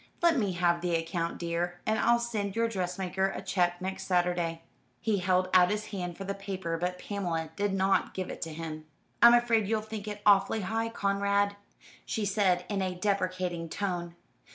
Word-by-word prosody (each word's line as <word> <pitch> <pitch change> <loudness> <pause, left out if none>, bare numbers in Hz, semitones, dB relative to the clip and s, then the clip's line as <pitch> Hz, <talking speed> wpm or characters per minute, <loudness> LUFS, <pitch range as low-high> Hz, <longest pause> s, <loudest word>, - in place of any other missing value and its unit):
Let 340 -1 +5
me 205 -8 +1
have 170 -1 +2
the 175 -1 0
account, 165 +1 -2
dear, 175 +1 -2
and 220 0 +1
I'll 235 - +4
send 215 -4 -3
your 230 0 +2
dressmaker 190 -2 -1
a - - -5
cheque 180 -2 0
next 190 +1 -4
Saturday." 175 -2 0 0.4
He 215 -3 0
held 185 0 +2
out 180 -1 +7
his 210 +1 -3
hand 180 -3 -4
for 195 - -5
the 195 +1 -3
paper, 190 -4 -4
but 180 +1 -2
Pamela 175 -5 -3
did 205 +2 0
not 190 0 +1
give 185 -1 -3
it - - -8
to 165 - -3
him. 155 -1 -6 0.4
"I'm 235 0 +9
afraid 230 -3 +3
you'll 220 0 +1
think 215 -1 -7
it 205 0 -6
awfully 205 +1 +4
high, 225 +4 -1
Conrad," 200 -1 +1 0.5
she 220 - -2
said, 190 -3 +2
in 200 -2 -1
a 185 -1 -1
deprecating 185 -3 -1
tone. 175 -2 -3
190 Hz, 185 wpm, -29 LUFS, 175-205 Hz, 0.5 s, I'm